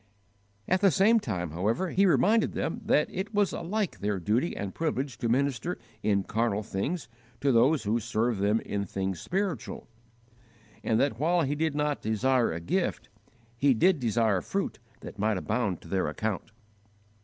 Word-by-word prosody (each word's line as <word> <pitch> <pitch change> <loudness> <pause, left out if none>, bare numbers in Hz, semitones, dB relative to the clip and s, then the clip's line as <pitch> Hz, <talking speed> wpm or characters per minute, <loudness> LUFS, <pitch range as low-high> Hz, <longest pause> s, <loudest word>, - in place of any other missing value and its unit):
At 185 +1 +2
the 200 - +6
same 205 - +4
time, 90 - -3
however, 110 - -1
he 195 +1 +4
reminded 215 +5 +3
them 230 - -3
that 150 -9 +3
it 195 +3 -4
was 205 -1 +2
alike 195 +3 -2
their 100 -1 -1
duty 110 - 0
and 100 -2 -4
privilege 140 -5 -2
to 120 - -1
minister 140 +5 0 0.2
in 100 -3 +1
carnal 110 0 0
things 115 - -3 0.3
to 140 0 +2
those 130 +5 +4
who 110 +3 +1
served 115 -1 -1
them 105 +3 +2
in 100 -1 -3
things 95 -2 -3
spiritual, 185 - -3 1.0
and 110 0 +1
that 135 -5 +1
while 170 +3 +2
he 140 0 0
did 155 0 -1
not 150 -1 0
desire 120 +3 +2
a 80 - -3
gift, 85 - -2 0.5
he 135 +2 +3
did 175 +7 +3
desire 115 -5 +1
fruit 195 -7 -3 0.2
that 105 - -10
might 105 0 +1
abound 105 -2 -1
to - - -13
their 95 +2 0
account. 110 -1 -3
120 Hz, 165 wpm, -28 LUFS, 105-165 Hz, 1.0 s, the